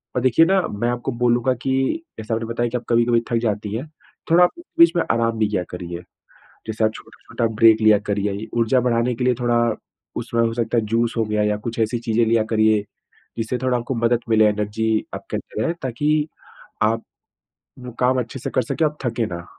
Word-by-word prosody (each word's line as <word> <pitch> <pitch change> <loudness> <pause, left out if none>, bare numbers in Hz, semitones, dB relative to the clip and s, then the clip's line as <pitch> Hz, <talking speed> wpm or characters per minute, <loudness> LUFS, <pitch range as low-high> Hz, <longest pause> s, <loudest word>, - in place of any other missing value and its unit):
और 125 - +1
देखिए 130 +6 +4
ना, 190 +2 +3
मैं 110 +4 -2
आपको 120 0 -2
बोलूँगा 120 +1 +3
कि, 135 - 0 0.2
जैसे 110 +1 -4
आपने 115 0 -2
बताया 120 +1 -1
कि 125 - -2
आप 120 - -9
कभी-कभी 120 0 +3
थक - - -1
भी 115 - +3
जाती 105 -2 -2
हैं, 130 +7 -4 0.4
थोड़ा 175 +2 +7
आप 175 - +5 0.3
बीच 335 - +8
में 170 - +2
आराम 115 -1 0
भी 110 - +3
किया 95 -4 -1
करिए। 85 -1 -6 0.7
जैसे 110 0 -1
आप 110 - +3
छोटा-छोटा 115 - -5
ब्रेक 110 0 +6
लिया 110 -1 +6
करिए। 100 0 0
ये 100 +3 -5
ऊर्जा 120 +3 +3
बढ़ाने 120 0 +1
के 125 +2 -3
लिए 125 - +3
थोड़ा, 120 -2 +2 0.4
उसमें 115 - -2
हो 115 0 +1
सकता 115 0 0
है, 115 - +1
जूस 115 +2 0
हो 115 - +2
गया, 105 0 0
या 105 0 +1
कुछ 115 +3 -6
ऐसी 115 +2 0
चीज़ें 115 0 +1
लिया 115 0 +3
करिए, 110 -2 +3 0.5
जिससे 115 +2 -2
थोड़ा 130 -1 +1
आपको 120 +3 -4
मदद 115 +1 +2
मिले, 110 -1 +5
एनर्जी 105 +1 -1
आपके - - -5
अंदर 110 - -5
रहे, - - +1
ताकि, 150 +4 0 0.5
आप, 115 +1 +1 0.8
वो 125 0 -8
काम 130 +1 +3
अच्छे 125 +2 -5
से - - -4
कर 130 - +2
सकें, 155 +7 -1
आप 150 0 -2
थके 115 -1 0
ना, 85 -2 -7
115 Hz, 215 wpm, -21 LUFS, 110-125 Hz, 0.8 s, बीच